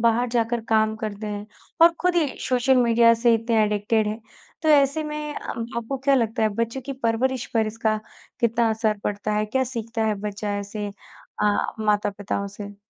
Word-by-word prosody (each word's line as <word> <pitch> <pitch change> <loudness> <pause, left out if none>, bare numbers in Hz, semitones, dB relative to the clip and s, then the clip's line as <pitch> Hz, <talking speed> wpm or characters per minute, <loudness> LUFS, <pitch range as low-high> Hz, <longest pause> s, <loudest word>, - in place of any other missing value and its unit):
बाहर 235 +2 +2
जाकर 235 0 0
काम 220 -1 +3
करते 215 -1 -5
हैं 205 0 -5 0.4
और 335 0 +8
खुद 360 0 +2
ही 330 -3 +3 0.2
सोशल 255 +1 +3
मीडिया 235 -1 +5
से 235 - +6
इतने 225 -1 +2
एडिक्टेड 210 +1 +1
हैं। 215 +2 -4 0.4
तो 315 - +1
ऐसे 285 0 +4
में 300 0 -4
अ, - - -7 0.3
आपको 235 +4 -3
क्या 275 +1 +3
लगता 230 -2 +1
है 220 - +4
बच्चों 230 +4 -2
की 275 - -5
परवरिश 255 0 -1
पर 220 -1 +3
इसका 215 0 -1 0.4
कितना 235 0 +2
असर 220 -1 0
पड़ता 205 +1 -2
है? 210 0 +1
क्या 260 +5 0
सीखता 230 -2 -3
है 215 - +1
बच्चा 205 0 -3
ऐसे 205 +1 -5 0.5
अ, 205 -1 +1
माता-पिताओं 205 -1 -1
से? 205 0 -9
225 Hz, 180 wpm, -24 LUFS, 210-250 Hz, 0.5 s, और